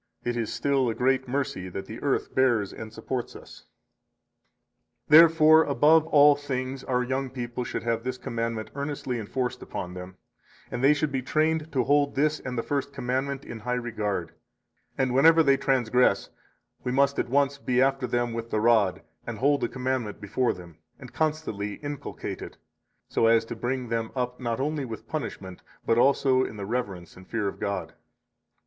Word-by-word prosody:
It 120 0 -1
is 115 -2 -2
still 135 -3 +1
a 115 - -2
great 130 +2 +1
mercy 125 -8 -2
that 95 +2 -6
the 110 +3 -9
earth 140 -2 -1
bears 120 -6 +2
and 110 -1 -8
supports 120 +2 -5
us. - - -13 1.4
61 150 +2 +9
Therefore, 160 -1 +7
above 155 +3 +4
all 145 -2 +6
things, 135 -2 -4
our 125 -1 0
young 130 +1 -2
people 125 -1 -4
should - - -4
have 115 -1 -1
this 130 0 -3
commandment 115 -2 -4
earnestly 140 -3 -3
enforced 125 +3 -3
upon 90 0 -6
them, 90 0 -9 0.5
and 125 - -3
they 145 +2 +6
should 150 0 -1
be 135 -1 -1
trained 155 +3 0
to 130 - +2
hold 145 +1 +2
this 150 +2 +1
and 125 -1 -6
the 115 - -1
First 140 -1 -2
Commandment 135 +2 -2
in 115 - -7
high 125 +3 -2
regard; 105 -7 -3 0.7
and 130 -2 +1
whenever 160 +5 +6
they 140 -2 +5
transgress, 125 -3 +2 0.5
we 125 - -2
must 140 +1 +2
at - - -1
once 140 +1 +2
be 125 -2 0
after 135 -1 +2
them 120 0 -1
with 115 0 -5
the 110 - 0
rod, 105 -5 +3 0.2
and 115 -2 -4
hold 140 +4 +2
the - - 0
commandment 130 -5 -3
before 105 +5 0
them, 85 -3 -11 0.2
and 130 -2 -12
constantly 150 -10 -2
inculcate 145 -1 -6
it, - - -9 0.5
so 115 - +2
as 115 0 +4
to 115 - -6
bring 125 +1 -3
them 115 -1 -1
up 125 -1 -2
not 120 -2 -2
only 150 +1 -1
with 115 -4 -7
punishment, 95 -2 -5 0.2
but 115 - +3
also 130 -1 +4
in 110 - -6
the 100 - -5
reverence 100 -7 -4
and 95 0 -14
fear 110 -3 -2
of - - -5
God. 100 0 -3
125 Hz, 180 wpm, -26 LUFS, 115-140 Hz, 1.4 s, 61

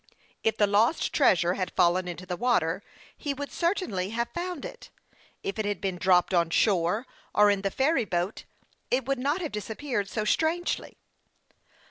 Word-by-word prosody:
If 225 - +1
the 210 - +5
lost 215 +9 +2
treasure 175 - +4
had 185 -1 -3
fallen 180 +1 +3
into 180 +1 -6
the 180 -1 -3
water, 185 -6 +1 0.3
he 285 -2 -3
would 285 +1 -6
certainly 335 - -1
have 235 +2 -2
found 350 -3 -4
it. - - -9 0.5
If 195 +2 -3
it 215 - 0
had 205 0 -1
been 190 -3 -3
dropped 185 0 +3
on 170 -2 +3
shore 185 +4 +2 0.3
or 210 0 +6
in 200 -1 0
the 195 - 0
ferry 265 +3 +1
boat, 180 +2 -2 0.4
it 255 0 +1
could 275 -1 -1
not 290 +8 0
have 320 - -3
disap 210 +1 -5
peared 240 -9 -2
so 215 +2 -2
strangely. 325 +9 0
210 Hz, 175 wpm, -27 LUFS, 185-270 Hz, 0.5 s, or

